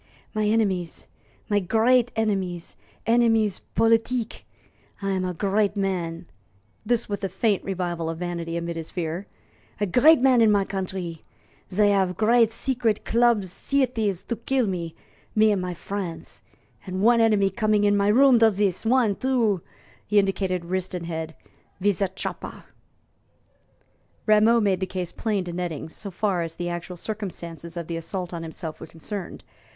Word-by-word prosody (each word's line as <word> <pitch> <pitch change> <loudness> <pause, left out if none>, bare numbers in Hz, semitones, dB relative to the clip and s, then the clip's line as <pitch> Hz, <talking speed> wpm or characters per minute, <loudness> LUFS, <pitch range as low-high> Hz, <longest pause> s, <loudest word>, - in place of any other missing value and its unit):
"My 215 -1 0
enemies 195 -6 0 0.4
my 205 -2 +2
great 230 +5 +3
enemies 195 -6 -2 0.3
enemies 225 -3 +3 0.2
politique. 225 +1 +1 0.5
I 195 -1 -2
am 190 -1 0
a 180 -1 -3
great 205 +3 +1
man" 175 -3 -2 0.6
this 235 +1 0
with 205 -1 -4
a 195 - 0
faint 210 -2 0
revival 175 -4 -2
of 165 - -4
vanity 170 -1 -3
amid 170 0 -4
his 165 -1 -5
fear 175 +2 -4 0.5
"a 205 - +2
great 275 - +6
man 255 -2 +5
in 220 -2 +6
my 200 -1 +3
countree. 185 -4 -4 0.5
Zey 205 +2 +4
have 190 -3 +1
great 230 +1 +4
secret 230 -2 -1
club 235 -3 +3
sieties 220 -1 -1
to 235 - -4
kill 260 +1 0
me 170 -4 -3 0.4
me 215 0 +5
and 200 -3 0
my 180 -1 -4
fren's; 185 -2 -6 0.5
and 185 +1 -2
one 235 +1 +5
enemy 210 -3 +3
coming 215 0 +1
in 205 0 +4
my 200 0 +2
rooms 250 +3 +6
does 220 -3 +5
zis 195 -2 0
one, 230 -3 +3
two" 230 -8 +1 0.5
he 210 - +1
indicated 190 -3 +1
wrist 185 +1 -2
and 175 -1 -4
head 160 -1 -5 0.4
"wiz 200 +1 +1
a 195 - +3
choppa." 190 +1 -6 1.6
Rameau 215 +2 +5
made 200 -4 +1
the 190 - -2
case 180 -2 -4
plain 210 -4 -1
to 175 -1 -6
Nettings, 170 -3 -4
so 205 - -6
far 190 -1 0
as 165 -1 -4
the 175 0 -3
actual 175 +1 -5
circumstances 170 -5 -6
of 170 - -3
the 165 +1 -4
assault 180 +2 -5
on 170 - -4
himself 160 -1 -7
were - - -9
concerned. 180 +3 -7
195 Hz, 160 wpm, -25 LUFS, 175-220 Hz, 1.6 s, great